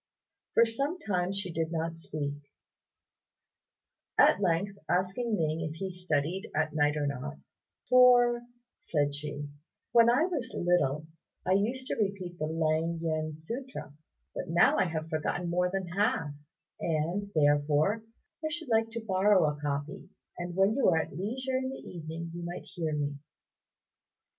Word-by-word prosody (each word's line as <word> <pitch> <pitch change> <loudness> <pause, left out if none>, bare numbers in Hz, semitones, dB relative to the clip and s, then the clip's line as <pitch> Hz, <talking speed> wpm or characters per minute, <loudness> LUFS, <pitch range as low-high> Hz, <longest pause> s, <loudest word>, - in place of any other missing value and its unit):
For 230 - +7
some 275 +9 -1
time 185 - -1
she 195 -3 -2
did 165 0 -1
not 165 0 -2
speak: 145 -3 -3 1.8
at 200 - +6
length 195 +2 0
asking 190 +6 +1
Ning 160 -3 0
if 155 -1 -3
he 190 +2 -4
studied 180 +2 -1
at 155 -1 +1
night 150 0 +2
or 150 - 0
not 125 - -4 0.5
"For," 245 -1 +6 0.4
said 145 -3 0
she, 145 0 -5 0.4
"when 235 0 +6
I 250 +6 +4
was 315 -9 -3
little 155 -4 +1 0.4
I 185 - +1
used 230 +7 +1
to - - -3
repeat 190 -4 -3
the 155 - 0
Lêng 160 +1 0
yen 155 -1 -2
sutra; 230 - -6 0.4
but - - -5
now 170 +1 +5
I - - +3
have 160 -2 -3
forgotten 165 +2 -2
more 180 +1 +2
than 190 0 -2
half, 200 - 0 0.5
and, 170 +6 -1
therefore, 145 +7 +3 0.4
I - - +1
should 325 -3 -4
like 225 0 +3
to 230 -1 -5
borrow 190 -3 +4
a 145 - -14
copy, 145 0 -3 0.3
and 175 0 -5
when 195 +3 +4
you 275 - +2
are 165 - +3
at 160 - -2
leisure 255 - -2
in 260 0 -2
the 265 - -6
evening 165 0 -6
you 175 - -6
might 175 +1 -6
hear 160 -3 -3
me." 145 -1 -2
175 Hz, 155 wpm, -30 LUFS, 155-210 Hz, 1.8 s, For